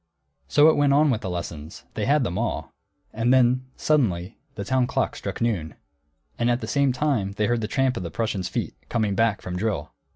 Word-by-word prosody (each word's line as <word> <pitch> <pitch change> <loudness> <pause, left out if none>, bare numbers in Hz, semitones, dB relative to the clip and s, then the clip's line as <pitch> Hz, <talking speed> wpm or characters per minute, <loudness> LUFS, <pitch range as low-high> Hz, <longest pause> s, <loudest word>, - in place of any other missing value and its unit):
So 145 +1 +5
it 160 - +5
went 145 -1 +3
on 150 0 +4
with 110 - -1
the 95 - -4
lessons; 85 -2 -6
they 105 - -2
had 145 0 +3
them 90 - -2
all. - - -3 0.4
And 115 +3 +1
then, 130 0 +4
suddenly, 105 - 0 0.2
the 100 - -4
town 130 +2 +2
clock - - -1
struck - - -5
noon. 95 -10 -1 0.6
And 120 0 +2
at 120 0 +2
the - - -5
same 140 -2 +2
time 125 -7 0
they 105 +1 0
heard 120 +1 +1
the 105 - -2
tramp 135 +1 +1
of - - -3
the 85 - -4
Prussians' 105 -1 -2
feet, - - -3 0.2
coming 110 -4 0
back 115 0 +1
from 90 0 -4
drill. 105 +1 -2
115 Hz, 215 wpm, -24 LUFS, 100-130 Hz, 0.6 s, So